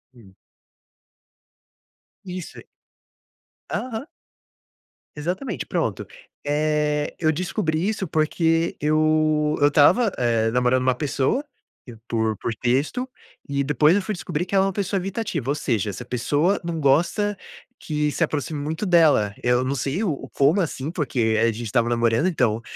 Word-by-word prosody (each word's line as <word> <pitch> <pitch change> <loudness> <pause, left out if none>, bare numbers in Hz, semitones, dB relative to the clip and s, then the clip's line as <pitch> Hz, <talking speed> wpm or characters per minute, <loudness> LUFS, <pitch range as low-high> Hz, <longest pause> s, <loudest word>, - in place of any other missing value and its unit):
Hum. 100 -6 -17 1.9
Isso. 180 -2 -7 1.1
Aham. 250 +3 -4 1.1
Exatamente, 180 - -3
pronto, - - -2 0.4
eh, 150 0 0
eu 155 -2 +3
descobri 175 0 -1
isso 210 -3 -2
porque 165 +1 +1
eu 155 0 +2
eu 145 - +5
estava, 180 - +4
eh, 115 -2 +1
namorando 125 +1 +2
uma 130 -1 +2
pessoa 145 - 0 0.6
por 110 -2 0
por 115 - -3
texto 145 - 0 0.4
e 140 0 0
depois 150 +4 +3
eu 205 - +2
fui 215 +3 -3
descobrir 175 -3 -3
que 185 - -11
ela 190 0 +4
é - - +1
uma - - -1
pessoa 200 0 -1
evitativa, 180 - -3
ou 145 - +1
seja, 110 -8 -1
essa 120 +5 -6
pessoa 145 - 0
não 170 -1 -3
gosta 170 +9 +2 0.4
que 150 -1 -1
se - - 0
aproxime 145 0 -2
muito 160 +7 -3
dela. 155 - +4
Eu 125 +1 +2
não 130 +2 -1
sei 140 - -2
o 155 -10 -3
como, 145 +8 +3
assim, 150 -2 -3
porque 120 -9 0
a - - +4
gente 115 +1 -2
estava 120 +1 +1
namorando, 115 +5 +2
então 120 -10 +1
150 Hz, 140 wpm, -23 LUFS, 125-175 Hz, 1.9 s, eu